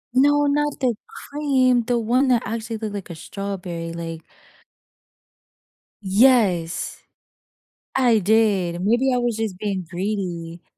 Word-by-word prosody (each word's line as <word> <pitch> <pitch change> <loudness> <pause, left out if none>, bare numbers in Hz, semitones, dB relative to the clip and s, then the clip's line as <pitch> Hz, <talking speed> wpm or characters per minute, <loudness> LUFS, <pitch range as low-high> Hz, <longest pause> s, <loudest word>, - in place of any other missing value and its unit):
No, 290 +2 +4
not 295 0 0
the 255 -3 +2
cream, 280 - +1
the 245 0 +1
one 240 +4 +2
that 245 -3 +3
actually 225 +2 -4
looked 215 -1 -5
like 200 -2 -6
a 170 - -7
strawberry 175 -2 -5
like 165 -1 -6 1.8
Yes. 195 -5 +2 1.0
I 245 -4 +4
did. 195 -4 +2
Maybe 240 +6 +2
I - - +2
was 240 -2 0
just 220 -5 -3
being 195 -3 -3
greedy. 175 -3 -4
215 Hz, 120 wpm, -22 LUFS, 180-250 Hz, 1.8 s, No